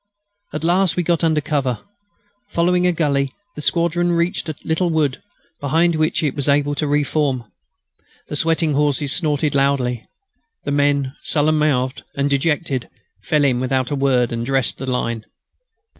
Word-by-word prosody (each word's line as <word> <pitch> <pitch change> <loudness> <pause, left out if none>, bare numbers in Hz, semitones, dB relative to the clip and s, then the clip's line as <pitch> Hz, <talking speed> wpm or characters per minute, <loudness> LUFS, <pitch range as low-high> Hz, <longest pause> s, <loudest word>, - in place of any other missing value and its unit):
At 155 - -5
last 180 +1 +2
we 180 - 0
got 170 0 +1
under 160 -2 +2
cover. 140 -6 -1 0.7
Following 180 +1 +2
a - - +4
gully, 140 -5 0 0.2
the 150 - -6
squadron 170 +2 +1
reached 170 0 0
a 155 - -4
little 165 +2 +1
wood, 150 -5 0 0.4
behind 165 +5 +2
which 155 0 0
it 145 - +1
was 145 0 0
able 145 0 +2
to 150 +1 -1
re 145 +1 +2
form. 140 -4 0 0.8
The - - -4
sweating 160 0 +2
horses 145 0 +1
snorted 150 -3 0
loudly. 135 -4 +1 0.6
The - - -3
men, 145 -1 +1
sullen 155 0 +2
mouthed 130 -4 +1
and 140 0 0
dejected, 140 -2 0 0.3
fell 150 -2 +1
in 130 -3 +2
without 130 0 0
a - - +1
word 130 -3 +2
and 115 0 -2
dressed 135 -1 0
the 135 0 -4
line. 115 -3 -2
145 Hz, 160 wpm, -20 LUFS, 135-160 Hz, 0.8 s, a